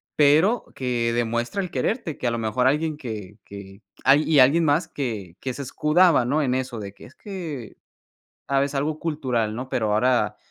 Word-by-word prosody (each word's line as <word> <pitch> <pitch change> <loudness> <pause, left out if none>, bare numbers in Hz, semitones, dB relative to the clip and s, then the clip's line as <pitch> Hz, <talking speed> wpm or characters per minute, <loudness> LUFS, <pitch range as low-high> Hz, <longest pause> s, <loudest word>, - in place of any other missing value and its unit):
Pero 155 +11 +4
que 120 -2 -1
demuestra 120 - -1
el 180 -2 -5
quererte, 175 - -2
que 125 - -1
a - - +1
lo 115 - -2
mejor 115 +3 0
alguien 150 +2 0
que 105 -6 -7
que 100 0 -11 0.2
ay, 140 +3 +5
y 155 -3 +3
alguien 140 +6 +5
más 150 +3 +2
que 105 - -5
que 130 - -4
se 140 - -7
escudaba, 150 +2 +3
¿no? 145 +5 +1
En 130 -4 0
eso 130 -3 -3
de 100 -2 -7
que - - -15
es 130 - -16
que 165 - -7 0.7
¿sabes?, 140 +1 0
algo 150 +3 -1
cultural, 125 -9 -1
¿no? 125 +3 -6
Pero 110 -3 0
ahora 110 -2 +2
130 Hz, 190 wpm, -23 LUFS, 115-150 Hz, 0.7 s, ay